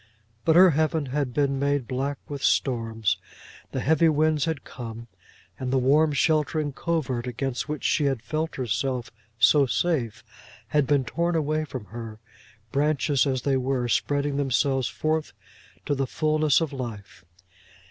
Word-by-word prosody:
But 160 - +4
her 185 0 +8
heaven 155 0 +1
had 140 -3 0
been 140 +1 0
made 140 -3 0
black 135 +2 -2
with 140 -2 -6
storms; 115 -4 +1 0.5
the - - -2
heavy 160 +3 +4
winds 155 -1 +2
had 160 -4 -3
come, 115 -2 -8 0.5
and 130 -1 -3
the 135 - +2
warm 145 +5 +4
sheltering 150 0 +1
covert 130 -7 -2
against 125 +3 -3
which 150 -2 -4
she 150 - +2
had 135 -5 0
felt 155 +5 -3
herself 125 0 -2 0.3
so 135 +5 +5
safe 130 -7 -1 0.5
had 150 -3 +2
been 140 -3 +2
torn 170 +8 -1
away 155 0 0
from 130 -7 -7
her 110 +2 -8 0.5
branches 145 0 +2
as 130 -2 -1
they 135 -2 +2
were 130 -1 -1
spreading 145 +3 0
themselves 135 -2 +1
forth 155 +4 -2 0.5
to - - 0
the 135 -1 -1
fulness 155 0 +2
of 155 -3 -2
life. 115 -6 -7
140 Hz, 150 wpm, -25 LUFS, 125-155 Hz, 0.5 s, her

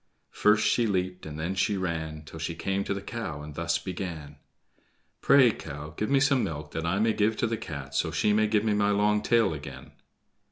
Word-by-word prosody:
First 105 0 +3
she 115 +1 +2
leaped, 90 -3 -2
and 75 0 -7
then 85 +4 -2
she 95 +2 +1
ran, 80 -4 -3
Till 80 +1 -10
she 80 +1 -3
came 95 +3 -1
to - - -1
the 100 - -6
cow, 100 -10 -5
and 75 0 -8
thus 85 +2 0
began: 85 -6 -6 0.8
"Pray, 130 -4 +6
cow, 75 -2 -8
give 105 - -2
me 140 0 +4
some 135 -2 +3
milk 75 -2 -5
that 80 +1 -3
I 95 +3 +1
may 110 +1 +2
give 110 +1 +1
to - - +1
the 115 0 -1
Cat, 70 -10 -7
so - - +1
she 105 - +1
may 110 +1 +3
give 105 -1 +2
me 110 -1 +1
my 105 0 +2
long 105 +1 +2
tail 115 -7 +3
again." 70 -3 -9
95 Hz, 215 wpm, -27 LUFS, 80-105 Hz, 0.8 s, Pray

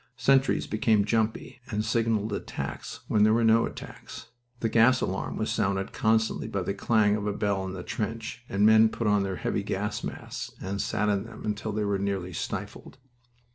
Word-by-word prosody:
Sentries 135 0 +3
became 110 -1 +2
"jumpy," 110 +3 -1
and 105 -2 -1
signaled 110 -2 0
attacks - - -5
when 105 - +2
there 110 +1 +5
were 115 - +2
no 115 +1 +4
attacks. 115 -1 -10 0.3
The 115 - 0
gas 115 +3 +5
alarm 95 +1 -3
was 110 - -1
sounded 100 -1 -1
constantly 110 0 +1
by 100 -2 -2
the 95 - -2
clang 105 0 +2
of 105 -1 -3
a 105 - 0
bell 100 -2 -1
in 95 - -5
the 90 -2 -6
trench, 115 +2 -4
and 100 +2 +2
men 110 0 +7
put 115 - -4
on 105 -1 +3
their 95 -1 -2
heavy - - -1
gas - - -3
masks - - -6
and 100 +2 -3
sat 105 -1 0
in 100 0 0
them 115 -2 -10
until 105 +1 -2
they 105 0 -1
were 100 -1 0
nearly 95 -2 -2
stifled. - - -5
105 Hz, 190 wpm, -27 LUFS, 100-115 Hz, 0.3 s, men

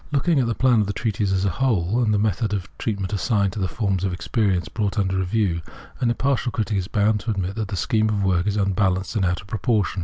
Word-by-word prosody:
Looking 150 +2 +2
at 125 - +1
the 115 - -1
plan 125 -4 +4
of 105 - -1
the 100 - -2
treatise 105 -2 -1
as 95 0 +1
a 95 - +2
whole 110 -1 +1
and 110 -3 +2
the 105 - +3
method 105 +1 0
of 95 -1 -6
treatment 100 -3 -2
assigned 100 -1 +1
to 110 - -5
the 95 - 0
forms 95 0 -1
of 95 -2 0
experience 90 -1 0
brought 105 +5 -2
under 95 -2 +1
review, 95 -2 0 0.4
an 125 -2 +1
impartial 125 0 0
critic 110 -2 -1
is 90 - -3
bound 105 0 +2
to 105 - -6
admit 95 -3 -1
that 110 0 -3
the 100 - -4
scheme 110 +4 +1
of 105 -2 0
the - - 0
work 90 0 +1
is 105 0 0
un 100 -1 +1
balanced 95 +1 0
and 105 - +1
out 90 0 0
of - - -16
proportion. 105 -2 0
105 Hz, 265 wpm, -23 LUFS, 95-110 Hz, 0.4 s, plan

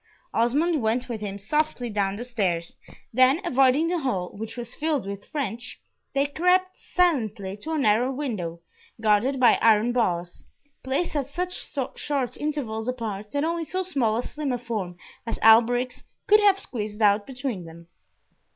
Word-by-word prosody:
Osmond 290 +7 +2
went 230 +3 0
with 230 -4 -5
him 200 -1 -4
softly 300 +4 -1
down 200 -3 -1
the 230 - -5
stairs, 190 -9 -2 0.4
then 255 +5 +5
avoiding 270 +1 +3
the 350 0 0
hall, 200 - -1
which 225 +3 -6
was 240 -1 -4
filled 300 -6 -1
with 200 0 -7
French, 250 -5 -4 0.4
they 275 +1 +3
crept 360 +5 +2
silently 220 - 0
to 210 +10 -7
a - - 0
narrow 245 0 +3
window, 210 - -4 0.4
guarded 220 +5 +2
by 250 - +5
iron 225 +1 +4
bars, 175 -8 -1 0.4
placed 275 +6 -1
at 280 -3 -1
such 360 +5 -3 0.5
short 275 -4 -1
intervals 255 -7 -3
apart 215 -5 -4
that 285 +4 -1
only 335 +1 -1
so 370 +4 -2
small 265 -12 0
and 240 - -2
slim 295 -2 -3
a 250 - 0
form 215 -7 -4 0.3
as - - -2
Alberic's 240 +3 +5 0.2
could 425 +1 +6
have 405 -2 +5
squeezed 215 - -4
out 205 0 +4
between 250 -8 -4
them. 165 +1 -13
245 Hz, 160 wpm, -25 LUFS, 210-290 Hz, 0.5 s, could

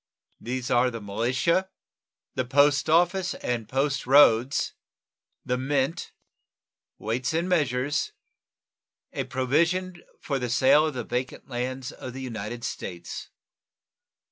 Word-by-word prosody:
These 125 0 -4
are 125 +1 +4
the 115 -2 -6
militia, 125 - 0 0.6
the 130 - 0
post 145 +4 +3
office 175 +3 +3
and 115 -3 -3
post 135 +1 0
roads, 130 -2 +5 0.7
the 125 -1 0
mint, 135 +3 -1 0.9
weights 125 +7 -2
and 170 +2 0
measures, 145 - 0 1.0
a - - -2
provision 170 +7 0 0.2
for 140 -3 -2
the 125 -1 -3
sale 135 +6 +5
of 150 - -4
the 120 - -3
vacant 125 +4 -4
lands 125 +1 -3
of 125 - -8
the 135 - -7
United 115 -1 -5
States. 85 -6 -6
130 Hz, 115 wpm, -26 LUFS, 120-145 Hz, 1.0 s, roads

